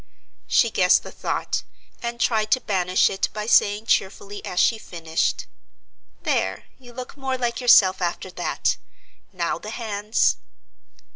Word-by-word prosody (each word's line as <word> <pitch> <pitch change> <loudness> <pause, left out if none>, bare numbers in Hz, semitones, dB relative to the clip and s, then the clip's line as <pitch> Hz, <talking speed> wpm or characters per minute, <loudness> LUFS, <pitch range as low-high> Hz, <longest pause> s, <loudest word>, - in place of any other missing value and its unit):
She 230 -3 +3
guessed 180 -3 +4
the - - -9
thought, - - -2 0.4
and 235 0 -4
tried 215 -3 +1
to 255 - +2
banish 185 -5 +2
it 195 - -1
by 210 0 -4
saying 210 -1 +3
cheerfully 200 0 -1
as 180 - -3
she 225 - +3
finished: 165 -5 -2 0.8
"There, - - -1 0.2
you 245 -2 -14
look 250 +1 -8
more 265 -1 -2
like 240 0 -2
yourself 195 -7 +6
after 175 +1 -3
that. - - -1 0.5
Now - - -2
the - - -8
hands." 215 -2 0
215 Hz, 140 wpm, -23 LUFS, 190-235 Hz, 0.8 s, yourself